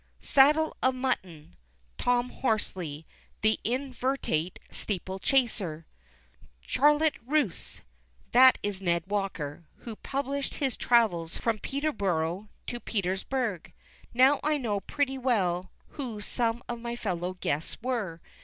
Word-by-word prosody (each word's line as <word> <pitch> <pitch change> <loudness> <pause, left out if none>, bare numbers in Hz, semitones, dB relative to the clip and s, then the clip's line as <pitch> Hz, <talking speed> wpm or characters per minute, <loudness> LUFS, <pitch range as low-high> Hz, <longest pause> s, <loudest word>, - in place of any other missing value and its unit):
'Saddle 300 +3 +4
of 260 0 +3
Mutton.' 190 - -3 0.4
Tom 245 0 +2
Horsley, 180 - -2 0.4
the 220 0 +3
inveterate 250 - -1
steeple 190 -1 -3
chaser. 195 - 0 0.7
'Charlotte 295 - +3
Russe.' 275 - -1 0.5
That 255 +2 +8
is 205 -2 -2
Ned 170 -2 +1
Walker, 180 -6 -3 0.2
who 230 -2 -5
published 275 0 -3
his 270 -4 -1
travels 190 -9 +2
from 225 -2 0
"Peterborough 200 - -1 0.2
to 240 - -4
Petersburg." 200 0 -2 0.4
Now 260 +4 +5
I 305 0 +2
know 220 -7 -1
pretty 270 +4 -1
well 185 -8 +1 0.2
who 245 -7 -5
some 230 +2 0
of 240 -1 -4
my 235 0 -3
fellow 185 -5 -3
guests 150 +3 -2
were. 215 -10 -2
230 Hz, 115 wpm, -29 LUFS, 185-260 Hz, 0.7 s, That